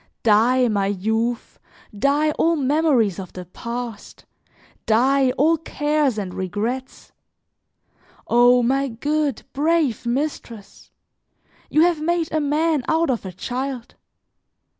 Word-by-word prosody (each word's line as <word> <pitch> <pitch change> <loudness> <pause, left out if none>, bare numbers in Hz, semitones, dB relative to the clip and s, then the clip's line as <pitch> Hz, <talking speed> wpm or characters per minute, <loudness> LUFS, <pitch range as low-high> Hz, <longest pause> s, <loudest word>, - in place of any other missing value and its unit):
Die, 235 +4 +4
my 200 -3 0
youth, 220 +4 -2 0.4
die 285 +7 +2
all 330 +2 +1
memories 275 - +1
of 185 -2 -8
the 180 -1 -8
past, 235 +4 -7 0.6
die, 260 +4 +3
all 315 +5 +2
cares 295 -5 -1
and 190 -3 -4
regrets! 220 +8 -4 1.2
O 245 +1 +5
my 270 +3 +1
good, 290 +2 -2
brave 295 -5 0
mistress! 235 -5 -5 0.8
You 305 - +3
have 340 -3 +1
made 335 0 -1
a 315 - 0
man 300 0 +1
out 320 -2 +2
of 230 -6 -3
a - - -6
child. 250 +5 -5
255 Hz, 115 wpm, -21 LUFS, 225-300 Hz, 1.2 s, O